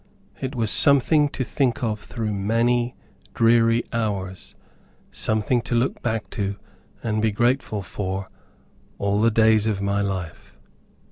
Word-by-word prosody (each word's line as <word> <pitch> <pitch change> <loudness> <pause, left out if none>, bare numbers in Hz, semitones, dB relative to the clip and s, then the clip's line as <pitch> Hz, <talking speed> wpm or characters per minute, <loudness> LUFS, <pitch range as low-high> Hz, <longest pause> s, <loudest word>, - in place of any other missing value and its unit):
It 130 +1 -4
was 115 -3 0
something 145 +3 +4
to 135 - -3
think 135 +1 -1
of 110 -2 -1
through 110 -1 -4
many 115 +4 +1 0.4
dreary 115 0 +4
hours, 100 -5 -3 0.6
something 110 +3 0
to 120 - -3
look 120 +3 0
back 115 -2 -2
to, 100 0 -2 0.5
and 110 -2 0
be 110 0 +2
grateful 120 -2 0
for, 95 0 -4 0.7
all 100 +1 0
the 115 - +5
days 110 -1 +4
of 105 -3 0
my 100 +1 0
life. 95 -5 -5
110 Hz, 135 wpm, -23 LUFS, 100-120 Hz, 0.7 s, the